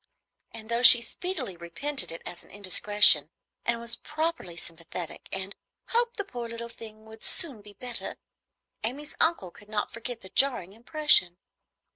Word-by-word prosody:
and 220 -1 -9
though 235 +1 0
she 240 -1 +10
speedily 260 - -3
repented 175 - -2
it 165 - -8
as 175 - -9
an - - -20
indiscretion, 205 -5 +4 0.4
and 235 0 +1
was 235 0 -4
properly 310 - -4
sympathetic, 165 0 -8
and 190 +1 -3 0.3
"hoped 475 +1 +2
the 405 - -1
poor 240 -10 -7
little 235 0 -6
thing 220 -1 -11
would 220 0 -14
soon 280 - 0
be 205 0 -14
better," 245 +2 -4 0.7
Amy's 280 +7 -2
uncle 320 - +2
could 205 +3 -17
not 215 -1 -3
forget 230 0 -6
the 190 - -12
jarring 240 -9 +1
impression. 240 - +3
230 Hz, 155 wpm, -27 LUFS, 190-270 Hz, 0.7 s, she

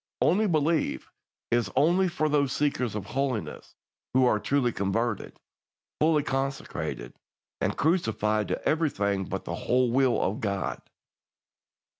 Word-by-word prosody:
"'Only 210 +5 +3
believe' 160 -2 0 0.4
is 120 -5 +2
only 175 +7 +4
for 170 -3 0
those 145 -3 +2
seekers 130 -6 0
of 105 -3 -4
holiness 130 -1 -3 0.4
who 130 0 +5
are 110 -4 +3
truly 135 0 +1
converted, 105 +3 -2 0.6
fully 155 -1 +3
consecrated, 135 - -3 0.5
and - - 0
crucified 110 - +1
to - - -3
everything 100 - +1
but 95 +1 -5
the 85 - -4
whole 125 +7 +1
will 130 -1 +3
of 105 +6 -1
God. 100 -3 -2
130 Hz, 125 wpm, -27 LUFS, 105-150 Hz, 0.6 s, who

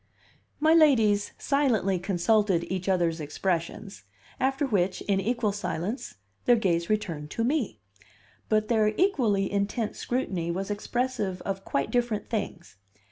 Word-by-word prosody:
My 315 +2 +4
ladies 225 -11 +4
silently 230 -10 +1
consulted 190 0 +2
each 185 0 -2
other's 170 -3 +1
expressions, 175 +6 -3 0.4
after 270 +2 +1
which, 190 -7 0
in 195 -1 +1
equal 230 +1 0
silence, 205 - -4 0.3
their 245 - +6
gaze 170 -6 0
returned 165 -8 -2
to 230 - -2
me; 240 - 0 0.7
but 215 -1 +2
their 215 -2 +2
equally 230 - +2
intent 205 +2 -1
scrutiny 190 -9 -2
was 190 +4 -2
expressive 210 -3 -2
of 195 0 -3
quite 140 - -1
different 235 -4 -1
things. 175 - -4
205 Hz, 130 wpm, -27 LUFS, 185-240 Hz, 0.7 s, their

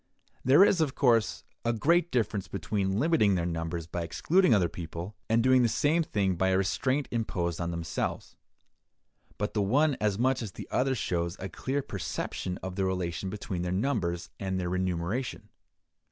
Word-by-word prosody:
There 145 +10 +7
is, 180 -5 +3
of 145 -4 0
course, 115 -5 +2 0.2
a 120 - +1
great 170 +9 +2
difference 110 - -1
between 100 -1 -1
limiting 140 - +3
their 85 -2 0
numbers 85 -1 -3
by 85 +1 -4
excluding 160 - +2
other 95 -6 +4
people, 85 +4 -7
and 115 +1 +3
doing 130 0 +5
the 120 - +3
same 150 +8 +2
thing 100 - 0
by 95 - +2
a 95 - +3
restraint 130 +8 0
imposed 90 -8 -2
on 85 - -1
themselves; 85 -2 -3 1.0
but 105 - -2
the 105 - +1
one 140 +9 +3
as 105 -2 +1
much 130 +3 +2
as 105 -5 -6
the - - -8
other 130 +1 +1
shows 85 -5 -1
a 95 - -6
clear 135 +7 -2
perception 95 -2 -4
of 95 0 -5
the 95 - +1
relation 90 0 -2
between 95 -3 -4
their 90 0 -2
numbers 95 -5 -1
and 95 -1 -2
their 90 -1 -2
remuneration. 95 +6 -2
100 Hz, 175 wpm, -29 LUFS, 90-130 Hz, 1.0 s, There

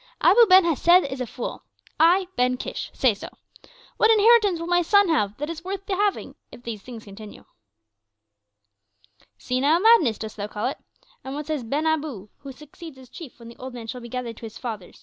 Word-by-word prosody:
Abu 465 +2 +5
Ben 375 0 +7
Hesed 345 +3 +4
is 265 -1 -5
a 250 - -3
fool! 235 - -7 0.4
I, 355 +4 +4
Ben 250 0 +1
Kish, - - -6
say 255 -4 +2
so. 200 - -9 0.7
What 445 - +4
inheritance 435 -4 +4
will 335 - -5
my 350 0 +2
sons 405 +1 +3
have 210 -10 0
that 295 - -4
is 330 0 -7
worth 390 +1 -6
the 385 - -2
having 410 +1 -1 0.2
if 245 - -14
these 225 -4 -6
things 235 -2 -11
continue?" 205 +1 -12 1.9
"Senile 275 - +1
madness, 380 - +4
dost 220 -1 -8
thou 205 0 -4
call 210 0 -5
it? 260 - -3 0.4
And 265 +1 -6
what 300 0 -5
says 305 -4 -3
Ben 285 +7 -2
Abu, 295 -11 -2
who 275 -1 -10
succeeds 300 +2 -13
as 260 -2 -15
chief 315 -8 -11
when 235 -1 -13
the 235 - -14
old 260 -1 -9
man 235 -2 -8
shall 245 +2 -7
be 235 - -10
gathered 240 -2 -6
to - - -10
his 220 - -12
fathers?" 215 -7 -8
275 Hz, 205 wpm, -23 LUFS, 235-350 Hz, 1.9 s, Ben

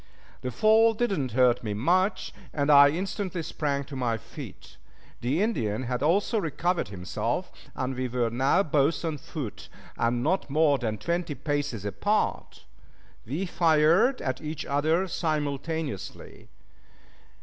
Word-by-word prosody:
The 130 - -3
fall 220 - +4
did 230 -3 0
not 130 - -3
hurt 125 -1 +3
me 105 -2 -3
much, 185 - +1 0.2
and 145 0 +1
I 140 0 +9
instantly 185 +1 -3
sprang 140 -3 -2
to 140 0 -9
my 120 -3 0
feet. 105 - -11 0.4
The 140 - 0
Indian 120 - -1
had 125 0 -2
also 200 +9 +2
recovered 175 +1 -1
himself, 90 -2 -3 0.2
and 130 0 -2
we 130 0 -2
were 120 -1 -1
now 135 +10 +3
both 150 0 +1
on 155 -3 -2
foot, 135 -8 -7 0.3
and 120 +1 0
not 180 +2 0
more 145 -1 +3
than 110 -3 -2
twenty 170 - -2
paces 145 -9 -2
apart. 205 - -1 0.6
We 155 +10 -2
fired 170 - +3
at 130 -1 -2
each 155 0 -5
other 155 +6 +1
simultaneously. 155 - -3
145 Hz, 140 wpm, -27 LUFS, 125-175 Hz, 0.6 s, I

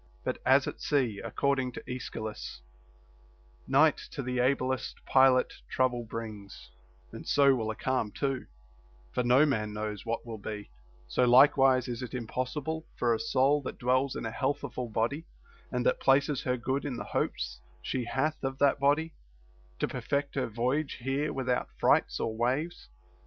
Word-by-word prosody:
But - - -2
as - - +6
at - - -6
sea 125 -8 0
(according 135 -3 0
to - - -8
Aeschylus) 110 - -6 1.0
Night - - +5
to - - -5
the 125 0 -2
ablest 130 0 0
pilot 130 -1 +4 0.2
trouble 125 -2 +1
brings,* 110 -3 -8 0.4
and - - -9
so 140 -1 +5
will 115 -4 -1
a 110 - -3
calm 130 -4 -1
too, 135 0 -2 0.6
for - - 0
no 125 +4 +5
man 110 -7 -1
knows 105 -1 -4
what 115 0 -3
will 115 -2 -6
be, 105 0 -7 0.2
— - - -29
so 125 - +4
likewise 130 0 +6
is 120 0 -4
it 125 0 -5
impossible 135 +6 -3
for 120 -1 +2
a 110 - -1
soul 135 +5 +2
that 130 - -6
dwells 130 +2 +1
in - - -4
a 115 - -3
health 140 +4 -1
ful 125 -2 -4
body, 115 +8 -1 0.5
and - - -1
that - - +2
places 140 +1 +3
her 125 0 0
good 130 +3 -1
in 140 -4 -3
the - - -4
hopes - - -2 0.2
she 125 -2 -2
hath 150 +6 -1
of 135 0 -2
that 140 0 +3
body, 150 +4 +2 0.6
to - - 0
perfect 140 0 -2
her 135 - -1
voyage 125 +6 -1
here 135 +4 -1
without 130 -2 -1
frights - - +3
or 110 - -2
waves. 130 - -1
130 Hz, 170 wpm, -30 LUFS, 115-140 Hz, 1.0 s, as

